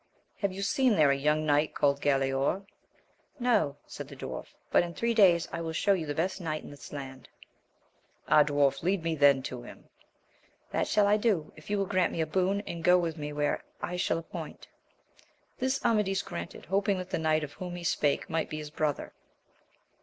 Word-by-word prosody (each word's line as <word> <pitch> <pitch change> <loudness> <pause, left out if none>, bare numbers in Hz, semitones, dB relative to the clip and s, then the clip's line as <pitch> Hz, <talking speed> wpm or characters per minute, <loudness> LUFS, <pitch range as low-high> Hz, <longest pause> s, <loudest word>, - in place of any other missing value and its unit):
— - - -43
Have 200 -2 +1
you 195 +1 -5
seen 250 +2 +3
there 150 -5 +5
a - - +3
young 150 +2 +1
knight 150 +1 +2
called 140 -1 +2
Galaor? 135 +6 +1 0.7
No, 220 - +2
said - - -8
the - - -10
dwarf, - - -6 0.2
but - - +5
in 170 -1 -5
three 235 0 0
days 180 -6 +5
I 165 - -3
will 165 -1 -4
show 200 +5 +3
you 165 -5 -2
the 145 - -3
best 185 +4 -1
knight 155 -2 -3
in - - -10
this 145 - -11
land. 135 -2 -8 0.5
— - - -38
Ah, 155 - +6
dwarf, 145 -2 +1
lead 185 0 0
me 165 -1 0
then 140 -3 +4
to 125 -2 -5
him. 120 - -13 0.4
— - - -36
That - - 0
shall 210 -1 +3
I 205 +1 +4
do, 205 -8 0
if 155 - -14
you 205 - +1
will 195 - +1
grant 185 -2 +1
me - - -4
a - - +1
boon, 190 +5 +1
and 170 -5 -7
go 180 +1 +6
with 170 -2 -1
me 150 -2 -5
where 145 0 -1 0.2
I 180 - -3
shall 180 -2 0
appoint. 165 - -8 0.9
This 260 +2 0
Amadis 210 -4 +2
granted, 85 0 -7
hoping 195 0 +1
that 185 0 -6
the - - 0
knight 155 -1 +2
of 145 -1 -6
whom 180 -1 -6
he 175 - -7
spake 145 -3 +1
might 165 0 -1
be 155 - -4
his 150 -1 -7
brother. 150 -2 -2
165 Hz, 215 wpm, -29 LUFS, 145-195 Hz, 0.9 s, Ah